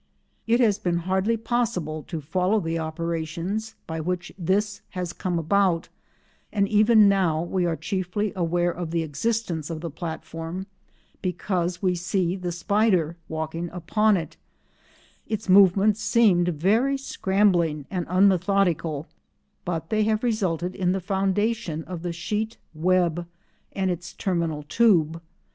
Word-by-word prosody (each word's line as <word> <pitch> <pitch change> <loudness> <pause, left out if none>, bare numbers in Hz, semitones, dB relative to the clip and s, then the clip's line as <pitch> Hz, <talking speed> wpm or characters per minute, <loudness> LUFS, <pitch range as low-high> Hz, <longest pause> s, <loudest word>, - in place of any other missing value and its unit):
It 235 +2 +3
has 215 -4 +3
been 175 -4 0
hardly 190 +5 +1
possible 205 -10 -1
to 165 -4 -4
follow 185 +8 +1
the 165 -2 -2
operations 170 +6 -3
by 160 0 -4
which 180 +2 -3
this 200 +3 0 0.2
has 180 -2 -3
come 180 -1 -2
about, 170 +1 +1 0.6
and 200 -2 +1
even 215 0 +6
now 180 -5 +2
we 175 0 0
are 165 - 0
chiefly 195 +3 -2
aware 175 0 +1
of 170 -1 -5
the 165 0 0
existence 165 +1 -2
of 160 -2 -5
the 165 -2 -5
platform 165 +2 -6 0.6
because 180 -1 -2
we 185 -1 +3
see 180 0 0
the 180 -2 -4
spider 180 -3 +1
walking 160 +2 -3
upon 200 +5 +2
it; 160 -3 -6 0.9
its 215 -1 -3
movements 195 +2 +5
seemed 210 -5 +4
very 210 - +2
scrambling 190 - +1
and 180 -3 -2
unmethodical, 185 -5 +2 0.6
but 165 -2 -3
they 215 0 +2
have 220 +1 +1
resulted 185 -7 0
in 180 -1 0
the 195 - -1
foundation 195 -2 -1
of 180 -1 -7
the 175 0 -3
sheet 210 +7 -3 0.2
web 175 0 +1 0.5
and 190 -1 0
its 175 +1 -6
terminal 165 -5 -1
tube. 165 -3 +3
180 Hz, 135 wpm, -25 LUFS, 165-205 Hz, 0.9 s, even